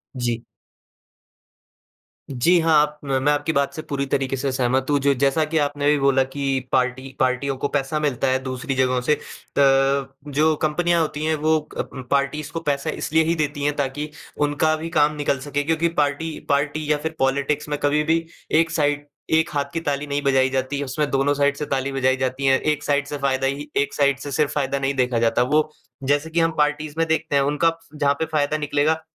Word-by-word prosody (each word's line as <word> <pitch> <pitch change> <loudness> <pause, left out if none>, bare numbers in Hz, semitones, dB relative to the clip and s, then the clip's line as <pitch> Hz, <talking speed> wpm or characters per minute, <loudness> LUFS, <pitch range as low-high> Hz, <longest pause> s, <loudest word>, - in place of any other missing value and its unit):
जी। 120 -2 -2 1.9
जी, 170 +8 +3
हाँ, 165 -1 +2
आप 150 0 -2
मैं 135 +1 +1
आपकी 145 +2 0
बात 140 -1 +1
से 155 - -5
पूरी 140 -1 -1
तरीके 135 0 -1
से 135 +1 -1
सहमत 130 0 +1
हूँ, 145 - +3
जो 140 0 +3
जैसा 140 +4 +2
कि 165 - +1
आपने 145 -1 0
अभी 150 0 +4
बोला 135 -1 +3
कि 135 0 -2
पार्टी 130 +1 -1
पार्टियों 130 +1 +1
को 145 - -1
पैसा 145 +1 -1
मिलता 140 -3 0
है, 130 0 +2
दूसरी 130 +1 -3
जगहों 130 -1 +2
से। 140 +5 +2
अ, - - -3 1.1
जो 155 +3 +3
कंपनियाँ 170 +2 +2
होती 150 -1 -2
हैं 160 0 +2
वो 160 0 +4 0.2
अ, - - 0 0.3
पार्टीज़ 145 +2 0
को 165 - -3
पैसा 140 -1 -1
इसलिए 160 +1 +1
ही 165 +1 +1
देती 145 -2 -2
हैं, 145 0 +1
ताकि 145 +2 -2 0.4
उनका 155 +2 +1
भी 160 +2 -5
काम 150 0 +4
निकल 145 -2 0
सके 145 +1 -2
क्योंकि 165 +2 +1
पार्टी 150 +2 -2
पार्टी 145 +2 0
या 150 - +3
फिर 160 +2 -5
पॉलिटिक्स 140 +3 0
में 145 - -1
कभी 150 +1 +2
भी 165 +1 +1 0.3
एक 165 0 +1
साइड, 145 -2 0 0.2
एक 160 +1 +3
हाथ 140 -1 -2
की 165 - -1
ताली 145 +1 -1
नहीं 145 0 -1
बजाई 135 -1 +3
जाती 135 +2 -2
उसमें 140 +2 -2
दोनों 135 +1 +2
साइड 140 0 +2
से 150 - -3
ताली 135 +1 -2
बजाई 130 -1 +1
जाती 130 +1 -2
हैं। 135 0 +4
एक 150 -1 0
साइड 145 -1 0
से 145 - -4
फ़ायदा 135 -1 0
ही 145 +2 -4
एक 140 - +1
साइड 140 -2 +2
से 145 +1 -6
सिर्फ 150 +1 +1
फ़ायदा 140 -1 -1
नहीं 135 0 0
देखा 125 -2 +1
जाता, 115 +1 +2
वो 155 +4 +1 0.3
जैसे 145 +3 +1
कि 165 +1 0
हम 165 0 +3
पार्टीज़ 150 +1 0
देखते 160 -2 0
हैं, 140 - +4
उनका 155 +4 +1 0.2
जहाँ 145 -1 +2
पे 160 - +1
फ़ायदा 150 +1 +1
निकलेगा, 150 +1 +1
145 Hz, 205 wpm, -22 LUFS, 135-150 Hz, 1.9 s, अभी